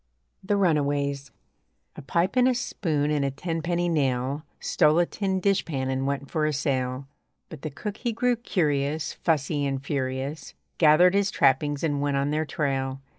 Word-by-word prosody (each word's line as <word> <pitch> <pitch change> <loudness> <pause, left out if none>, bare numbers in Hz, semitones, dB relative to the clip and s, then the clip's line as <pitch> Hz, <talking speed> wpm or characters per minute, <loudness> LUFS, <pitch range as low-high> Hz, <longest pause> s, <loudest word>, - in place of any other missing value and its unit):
THE 205 +1 +1
RUNAWAYS 145 -6 0 0.7
A - - -8
pipe 170 - 0
and 250 0 +5
a 255 - +2
spoon 155 -11 -1
and 150 -2 +1
a 140 - +1
tenpenny 170 +4 -2
nail 135 -3 0 0.2
Stole 150 +2 +3
a 175 - +4
tin 190 0 -2
dishpan 165 -9 0
and 130 +1 -1
went 140 0 -3
for 155 -1 +1
a 155 - -1
sail. 130 -2 -1 0.4
But 155 -4 -10
the 155 - -4
cook 205 +9 -6
he 240 - -2
grew 245 +2 +1
curious, 150 -9 -1
Fussy, 150 -2 0
and 135 -1 -2
furious; 140 +1 -3 0.2
Gathered 175 +3 +6
his 200 0 +2
trappings, 145 0 +2
and 145 -3 0
went 145 -1 0
on 140 +1 0
their 155 +1 0
trail. 135 -3 -2
150 Hz, 170 wpm, -26 LUFS, 140-175 Hz, 0.7 s, Gathered